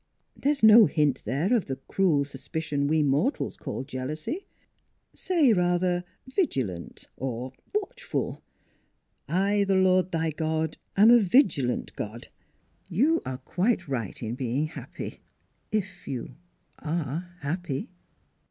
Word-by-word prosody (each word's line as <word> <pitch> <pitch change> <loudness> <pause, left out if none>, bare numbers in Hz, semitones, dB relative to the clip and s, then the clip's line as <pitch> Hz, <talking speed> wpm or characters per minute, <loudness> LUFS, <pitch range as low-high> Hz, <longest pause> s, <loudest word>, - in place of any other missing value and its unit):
There 285 - +1
is 285 -6 -3
no 220 -1 +9
hint 150 -4 +1
there 145 - +1
of 225 - +1
the 135 - -3
cruel 145 +2 +1
suspicion 145 +1 -3
we 155 +1 +3
mortals 145 - +1
call - - -5
jealousy. 150 - -4 0.7
Say 320 -10 +3
rather 180 -1 +1 0.2
4 260 - -14
vigilant 120 - -2
' - - -46
or 125 0 -4
* - - -37
watchful.' 420 -2 -3 0.5
' - - -35 0.2
I, 205 0 +3
the 195 -1 +2
Lord 185 -1 +3
thy 165 -1 0
God, 160 0 -1 0.2
am 215 +4 +8
a 240 - +8
vigilant 180 - +2
God.'... 110 +3 -6 0.6
You 295 - +3
are 130 - -3
quite 185 - 0
right 120 -5 -4
in 110 +1 -3
being 130 +3 -1
happy - - -8 0.5
if 190 -4 -3
you 130 -1 -5 0.5
are 165 +2 -3
happy." 155 0 -3
160 Hz, 135 wpm, -27 LUFS, 135-195 Hz, 0.7 s, no